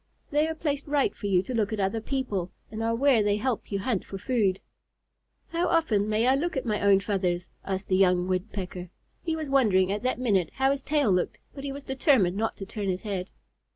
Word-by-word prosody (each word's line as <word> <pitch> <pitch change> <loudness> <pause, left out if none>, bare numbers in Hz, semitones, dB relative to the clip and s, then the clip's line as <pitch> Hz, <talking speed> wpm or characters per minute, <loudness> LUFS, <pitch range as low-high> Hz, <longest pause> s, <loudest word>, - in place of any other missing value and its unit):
They 300 +2 +3
are 320 - -3
placed 295 -3 -2
right 285 -1 +1
for 205 - -5
you 185 -2 +3
to 255 - -5
look 220 -3 0
at 215 - -2
other 200 +3 0
people, 215 -9 -2 0.2
and 220 0 -5
are 230 0 +1
where 260 -2 +4
they 205 0 +2
help 235 0 -2
you 200 - 0
hunt 205 -1 -1
for 195 - -7
food." 205 -3 +1 0.9
"How 340 +1 0
often 220 -12 +2
may 215 +2 +2
I 260 - +5
look 300 +3 -1
at 265 - -2
my 215 -3 -1
own 200 -1 +5
feathers?" 185 -3 -1
asked 190 0 -3
the 185 - +2
young 180 -2 +3
Woodpecker. 185 -1 -3 0.3
He 325 -2 -1
was 315 -2 -4
wondering 195 -9 +4
at 205 +1 -2
that 255 +2 0
minute 200 -9 +1
how 265 +1 +3
his 280 0 -1
tail 285 -5 +2
looked, 180 -1 0 0.2
but 275 - -8
he 280 - -3
was 280 +1 -7
determined 265 - +2
not 225 +2 -1
to 195 - -6
turn 200 0 -4
his 185 0 -2
head. 195 -3 -3
215 Hz, 225 wpm, -27 LUFS, 195-270 Hz, 0.9 s, I